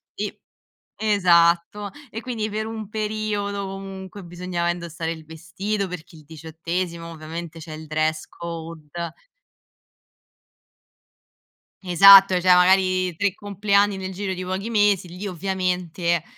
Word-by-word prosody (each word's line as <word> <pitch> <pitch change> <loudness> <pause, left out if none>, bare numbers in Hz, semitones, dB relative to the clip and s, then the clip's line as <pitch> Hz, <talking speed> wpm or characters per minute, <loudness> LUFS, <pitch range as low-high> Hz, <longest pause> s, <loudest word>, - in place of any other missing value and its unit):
e - - -4 0.6
esatto, 185 -1 +3 0.2
e 225 +1 -7
quindi 225 -4 -3
per 215 +1 -3
un 220 -2 -6
periodo 210 -2 -2
comunque 195 0 -8
bisognava 175 0 -2
indossare 170 -1 -4
il 160 -2 -10
vestito, 195 +5 -3
perché 175 -1 -9
il 155 - -15
diciottesimo 165 +2 -5
ovviamente 165 +1 -7
c'è 160 0 -9
il 155 0 -9
dress 155 +1 0
code. 165 -2 -8 2.9
Esatto, 195 +1 +8
cioè 180 0 +5
magari 185 0 +4
3 200 -2 +1
compleanni 200 0 +1
nel 190 0 -5
giro 190 0 -3
di 185 0 -5
pochi 190 +4 -3
mesi, 205 -5 +2
lì 180 +4 -6
ovviamente, 180 -2 -1
185 Hz, 115 wpm, -23 LUFS, 170-200 Hz, 2.9 s, Esatto